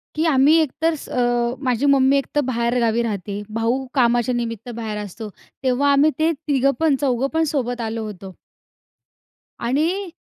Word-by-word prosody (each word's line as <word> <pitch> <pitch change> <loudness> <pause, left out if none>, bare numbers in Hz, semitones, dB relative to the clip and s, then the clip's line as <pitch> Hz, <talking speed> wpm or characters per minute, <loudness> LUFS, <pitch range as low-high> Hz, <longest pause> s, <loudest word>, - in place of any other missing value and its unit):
की 315 +2 0
आम्ही 290 0 +4
एक 295 -5 -1
तर 330 +1 +3 0.2
अ, 240 -1 0
माझी 255 +1 0
मम्मी 275 0 +4
एक 275 - -1
तर 295 - +4
बाहेर 235 0 0
गावी 230 0 +1
राहते, 205 -2 -4 0.2
भाऊ 250 +4 0
कामाच्या 240 -2 +2
निमित्त 230 -1 -4
बाहेर 220 -2 -4
असतो, 210 +3 -8 0.3
तेव्हा 265 +2 +2
आम्ही 285 +2 +4
ते 320 +1 +3
तिघं 275 -2 +1
पण 315 -4 +3
चौघं 265 -1 +1
पण 320 - +2
सोबत 245 -3 -2
आलो 225 0 -3
होतो. 195 -2 -9 1.3
आणि 335 +10 0
250 Hz, 165 wpm, -21 LUFS, 230-285 Hz, 1.3 s, आम्ही